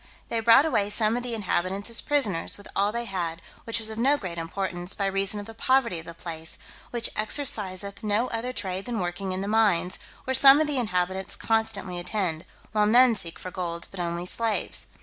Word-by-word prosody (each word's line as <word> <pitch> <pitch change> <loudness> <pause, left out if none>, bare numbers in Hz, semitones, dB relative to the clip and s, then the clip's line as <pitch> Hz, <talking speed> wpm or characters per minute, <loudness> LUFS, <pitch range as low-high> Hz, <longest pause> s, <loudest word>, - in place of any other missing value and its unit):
They 230 - 0
brought 230 +6 +6
away 205 -10 +1
some 215 +1 +2
of 245 - -1
the 245 -1 -3
inhabitants 195 -1 -1
as 230 - 0
prisoners, 220 - 0
with 205 - -13
all 200 +1 +2
they 235 +1 -3
had, 175 -5 -3 0.3
which 230 0 +1
was 220 0 -1
of 220 - -6
no 275 +5 +3
great 175 -8 -6
importance, 175 +1 -3
by 200 - -1
reason 195 +1 +1
of 205 - -7
the 225 - -10
poverty 235 -5 +1
of 165 - -12
the 170 - -8
place, 165 -1 -5 0.3
which 235 -1 +1
exerciseth 210 -5 +1
no 215 +3 +1
other 230 +2 -3
trade 190 -5 -4
than 240 -3 -3
working 180 +2 -3
in 185 +1 -3
the 200 - -3
mines, 205 -5 +2 0.2
where 260 - -2
some 270 +2 +8
of 310 - +3
the 295 -2 -1
inhabitants 190 -3 -2
constantly 220 -5 -1
attend, 175 -3 -2 0.3
while 210 0 +2
none 245 +2 +6
seek 170 -6 -3
for 185 - -8
gold, 170 -2 -4
but 195 - -9
only 170 0 -2
slaves. 225 +3 0
205 Hz, 210 wpm, -26 LUFS, 180-230 Hz, 0.3 s, some